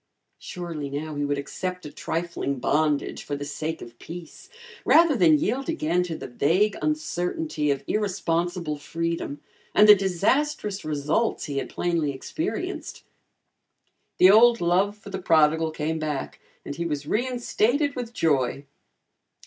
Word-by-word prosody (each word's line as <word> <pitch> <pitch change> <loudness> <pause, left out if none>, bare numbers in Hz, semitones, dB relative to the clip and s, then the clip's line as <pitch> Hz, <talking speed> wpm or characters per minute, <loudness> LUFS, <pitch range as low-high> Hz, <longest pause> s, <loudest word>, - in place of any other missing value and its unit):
Surely 165 -5 -6
now 150 +3 -4
he 145 0 -2
would 145 0 0
accept 180 +6 -5
a 150 - -7
trifling 165 -3 -3
bondage 150 +2 0
for 145 - -4
the 145 0 -5
sake 155 +2 -4
of 120 0 -13
peace, 170 - -10 0.3
rather 330 -3 +5
than 165 -8 +5
yield 255 - -1
again 180 - +1
to 175 -2 -3
the - - -7
vague 175 +11 +2
uncertainty 155 - -1
of 140 -1 0
irresponsible 175 -5 -1
freedom 165 -2 -3 0.3
and 210 - +7
the 210 - +12
disastrous 205 - 0
results 155 +9 0
he 140 -2 -2
had - - -5
plainly 170 -4 0
experienced. 315 - -4 1.1
The 185 - +8
old 230 +2 +6
love 185 +4 +1
for 205 -1 -12
the 190 -1 -4
prodigal 160 -1 +3
came 155 +1 -3
back 150 -3 -4 0.3
and 140 - -5
he 170 - -3
was 145 -2 -3
reinstated 250 - 0
with 245 -3 -5
joy. 140 - 0
170 Hz, 140 wpm, -25 LUFS, 150-205 Hz, 1.1 s, the